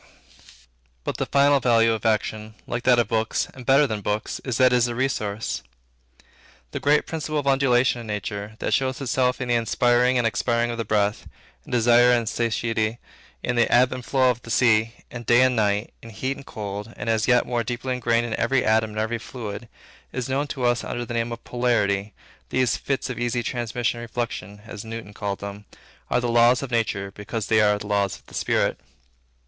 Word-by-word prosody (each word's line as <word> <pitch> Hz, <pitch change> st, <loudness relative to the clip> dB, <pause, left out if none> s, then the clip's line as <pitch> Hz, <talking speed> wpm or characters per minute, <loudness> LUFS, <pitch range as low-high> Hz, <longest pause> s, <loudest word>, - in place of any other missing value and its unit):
But -, -, -3 dB
the -, -, -2 dB
final 140 Hz, +1 st, +4 dB
value 115 Hz, -2 st, +4 dB
of 110 Hz, 0 st, -2 dB
action, 110 Hz, 0 st, -1 dB
like 120 Hz, -, -3 dB
that 125 Hz, -1 st, +5 dB
of 120 Hz, -3 st, +2 dB
books, 110 Hz, 0 st, 0 dB
and 125 Hz, -2 st, -12 dB
better 140 Hz, +2 st, +6 dB
than 110 Hz, -5 st, -3 dB
books, 105 Hz, +1 st, -2 dB
is, 130 Hz, -3 st, -2 dB
that 130 Hz, -1 st, +5 dB
it -, -, +5 dB
is 120 Hz, 0 st, +3 dB
a 120 Hz, -, -4 dB
resource. 110 Hz, -5 st, -2 dB, 1.1 s
That -, -, -4 dB
great 150 Hz, +1 st, +3 dB
principle 155 Hz, -1 st, -3 dB
of 145 Hz, -, -1 dB
Undulation 130 Hz, -3 st, +3 dB
in 115 Hz, -, -9 dB
nature, 105 Hz, 0 st, -4 dB
that -, -, -2 dB
shows 130 Hz, -1 st, 0 dB
itself 125 Hz, -1 st, 0 dB
in 130 Hz, -2 st, -4 dB
the -, -, +3 dB
inspiring 120 Hz, +2 st, +2 dB
and 120 Hz, -, +1 dB
expiring 120 Hz, 0 st, +1 dB
of 115 Hz, -, -5 dB
the 115 Hz, -, -2 dB
breath; 105 Hz, 0 st, 0 dB, 0.4 s
in -, -, -12 dB
desire 120 Hz, +1 st, +5 dB
and 120 Hz, -2 st, +2 dB
satiety; 115 Hz, 0 st, -1 dB, 0.5 s
in 120 Hz, -, -1 dB
the 120 Hz, -, +3 dB
ebb 125 Hz, +1 st, +5 dB
and 130 Hz, -1 st, -5 dB
flow 130 Hz, 0 st, +3 dB
of 120 Hz, 0 st, -6 dB
the 115 Hz, -, -12 dB
sea; 115 Hz, -1 st, +3 dB, 0.2 s
in 120 Hz, -, -6 dB
day 120 Hz, +2 st, +4 dB
and 130 Hz, -1 st, +3 dB
night; 105 Hz, 0 st, 0 dB
in 115 Hz, -, -11 dB
heat 130 Hz, +6 st, -3 dB
and 140 Hz, -, -13 dB
cold; 105 Hz, +1 st, -6 dB
and -, -, -6 dB
as 110 Hz, -1 st, +1 dB
yet 125 Hz, -1 st, +4 dB
more 120 Hz, -1 st, -1 dB
deeply 120 Hz, +2 st, -3 dB
ingrained 120 Hz, -1 st, +1 dB
in 115 Hz, -, -4 dB
every 125 Hz, +2 st, +2 dB
atom 110 Hz, 0 st, +3 dB
and 105 Hz, 0 st, -5 dB
every 115 Hz, +2 st, -1 dB
fluid, 110 Hz, -2 st, -7 dB, 0.4 s
is 125 Hz, -1 st, -3 dB
known 135 Hz, +2 st, -1 dB
to 135 Hz, -3 st, -5 dB
us 120 Hz, -1 st, +2 dB
under 120 Hz, 0 st, -4 dB
the 120 Hz, -, -6 dB
name 115 Hz, 0 st, -1 dB
of 115 Hz, 0 st, -7 dB
Polarity, 105 Hz, -5 st, 0 dB, 0.3 s
these 130 Hz, -2 st, +1 dB
"fits 135 Hz, -2 st, -2 dB
of 120 Hz, -, -6 dB
easy 120 Hz, 0 st, -1 dB
transmission 120 Hz, 0 st, -2 dB
and 120 Hz, 0 st, -8 dB
reflection," 105 Hz, -4 st, -5 dB
as 110 Hz, -2 st, -8 dB
Newton 115 Hz, -2 st, -7 dB
called 100 Hz, -1 st, -4 dB
them, 100 Hz, +1 st, -7 dB, 0.4 s
are -, -, +2 dB
the 120 Hz, -, -1 dB
law 120 Hz, 0 st, +5 dB
of 125 Hz, +1 st, 0 dB
nature 105 Hz, -4 st, -1 dB
because 105 Hz, +2 st, -5 dB
they 110 Hz, -1 st, +3 dB
are 105 Hz, -1 st, +3 dB
the 105 Hz, -, -8 dB
law 100 Hz, -1 st, +2 dB
of 100 Hz, -, -7 dB
spirit. -, -, 0 dB
120 Hz, 210 wpm, -24 LUFS, 110-125 Hz, 1.1 s, better